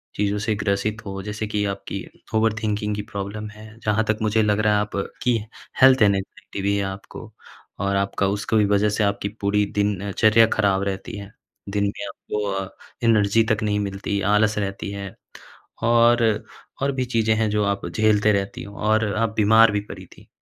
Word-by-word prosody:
चीज़ों 105 0 0
से 110 +1 -1
ग्रसित 100 +2 -1
हो। 95 -1 -5
जैसे 105 +1 -4
कि 105 -1 -1
आपकी 100 - -6 0.3
ओवरथिंकिंग 105 -1 0
की 105 - -3
प्रॉब्लम 105 +1 -5
हैं। 110 +1 -13
जहाँ 105 +1 +2
तक 110 - +1
मुझे 110 +1 +2
लग 105 0 +1
रहा 105 0 +3
है 105 - +3
आप 105 - -5 0.3
की 125 -1 +3 0.4
हेल्थ 130 -1 +7
एंग्जायटी 100 -1 0
भी 100 +1 +1
है 100 - 0
आपको। 95 +3 -8 0.5
और 100 0 0
आपका 100 0 0
उसका 105 +3 0
भी 105 - +4
वजह 100 +1 +2
से 105 +1 0
आपकी 100 0 -1
पूरी 105 +1 +2
दिनचर्या 105 +2 +3
खराब 100 -2 +1
रहती 100 +1 -4
है। 100 0 -9 0.4
दिन 100 0 0
में 100 0 -4
आपको 105 +1 -5
अ, 95 -1 -3 0.3
एनर्जी 115 -1 +4
तक 110 -1 0
नहीं 105 -1 0
मिलती, 100 0 -2
आलस 105 +2 +2
रहती 100 -1 -3
है। 100 -1 -7 0.7
और, 115 -1 +4 0.4
और 140 +1 +1
भी 130 -1 -1
चीज़ें 115 -3 +1
हैं 110 0 +1
जो 105 0 +1
आप 100 -2 -1
झेलते 105 +3 +3
रहती 100 -1 -2
हो 100 0 -11
और 110 +1 +2
आप 115 +1 +1
बीमार 110 +1 +6
भी 105 - 0
पड़ी - - -9
थी। - - -18
105 Hz, 185 wpm, -23 LUFS, 100-110 Hz, 0.7 s, हेल्थ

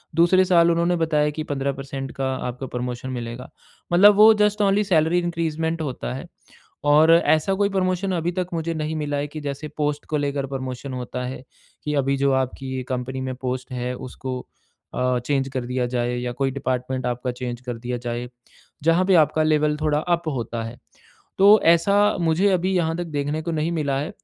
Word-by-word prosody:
दूसरे 175 +3 +5
साल 170 -2 +4
उन्होंने 170 +1 +2
बताया 155 -2 +1
कि 155 - -1
15 140 0 -1
परसेंट 135 0 -6
का 135 -1 -1
आपको 125 +2 -5
प्रमोशन 125 +1 -4
मिलेगा। 120 0 -6 0.4
मतलब 200 +4 +7
वो 215 +2 +8
जस्ट 210 0 +1
ओनली 200 +1 +3
सैलरी 170 -3 +2
इंक्रीज़मेंट 165 -1 -2
होता 125 - -4
है 65 - -6 0.7
और 155 +2 +6
ऐसा 160 +2 +3
कोई 200 +1 +1
प्रमोशन 190 0 0
अभी 170 +2 -1
तक 180 - -1
मुझे 165 0 -2
नहीं 155 0 -3
मिला 145 -1 -2
है 145 +1 -2
कि 155 +1 -8
जैसे 145 +1 -5
पोस्ट 150 -1 -1
को 155 - -1
लेकर 140 -1 -1
प्रमोशन 130 0 -5
होता 125 0 -5
है 125 0 -6 0.4
कि 150 - -2
अभी 135 +1 0
जो 140 0 +2
आपकी 130 +1 -6
ये 130 - -3
कंपनी 130 +1 -4
में 130 -1 -4
पोस्ट 130 +1 -4
है 125 0 -3
उसको 130 0 -6 0.5
अ, 125 0 +1
चेंज़ 135 -1 0
कर 130 -2 -4
दिया 125 0 -1
जाए 120 0 -1
या 125 0 -3
कोई 135 +2 -1
डिपार्टमेंट 130 -1 -2
आपका 125 +1 -2
चेंज़ 125 -1 -6
कर 120 -2 -4
दिया 120 +1 -4
जाए, 120 0 -4 0.6
जहाँ 165 +3 +3
पे 190 - +3
आपका 155 -1 +4
लेवल 150 -1 +2
थोड़ा 150 -1 +2
अप 170 +1 -1
होता 115 -1 -3
है। 115 +2 -7 0.6
तो 205 +3 +7
ऐसा 170 +4 +2 0.3
मुझे 170 +4 +2
अभी 185 +1 +1
यहाँ 165 -2 +1
तक 175 - -2
देखने 145 +2 -1
को 170 - -3
नहीं 160 +1 -1
मिला 145 -4 0
है। 150 +4 -3
145 Hz, 195 wpm, -23 LUFS, 125-165 Hz, 0.7 s, वो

